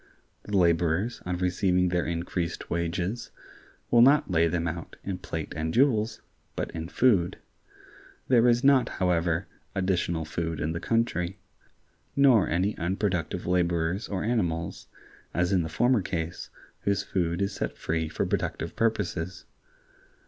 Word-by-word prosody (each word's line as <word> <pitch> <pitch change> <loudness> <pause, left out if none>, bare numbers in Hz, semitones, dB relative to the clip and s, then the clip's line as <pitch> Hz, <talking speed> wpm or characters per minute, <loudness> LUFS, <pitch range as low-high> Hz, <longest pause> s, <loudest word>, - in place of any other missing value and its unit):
The 105 -1 -1
laborers, 85 +5 +2
on 90 0 -1
receiving 90 0 +2
their 90 -2 0
increased 85 0 -3
wages, 90 +6 -2 0.6
will 120 - +6
not 140 -4 +5
lay 85 -1 +4
them 85 0 -1
out 85 0 -5
in 95 -2 -4
plate 80 -4 -5
and 80 +1 -2
jewels, 115 - +2 0.3
but - - -3
in 80 0 -5
food. 95 -8 +3 0.9
There 125 -2 +5
is 120 +1 +3
not, 135 -2 +5
however, 85 -1 +1 0.3
additional 90 -4 0
food 80 +1 -3
in 80 - -1
the 85 - -3
country; 100 -5 0 0.8
nor 135 -7 +5
any 90 +6 +1
unproductive 90 -1 -1
laborers 85 +1 0
or 95 -2 -2
animals, 90 -8 -1 0.5
as 90 +2 +1
in 95 -2 +3
the 80 - -3
former 120 +5 +2
case, 85 -2 -4 0.3
whose 100 0 0
food 85 -2 -1
is 100 0 0
set - - -4
free 80 -1 -1
for - - -1
productive - - -2
purposes. 95 -6 -1
90 Hz, 140 wpm, -27 LUFS, 85-105 Hz, 0.9 s, will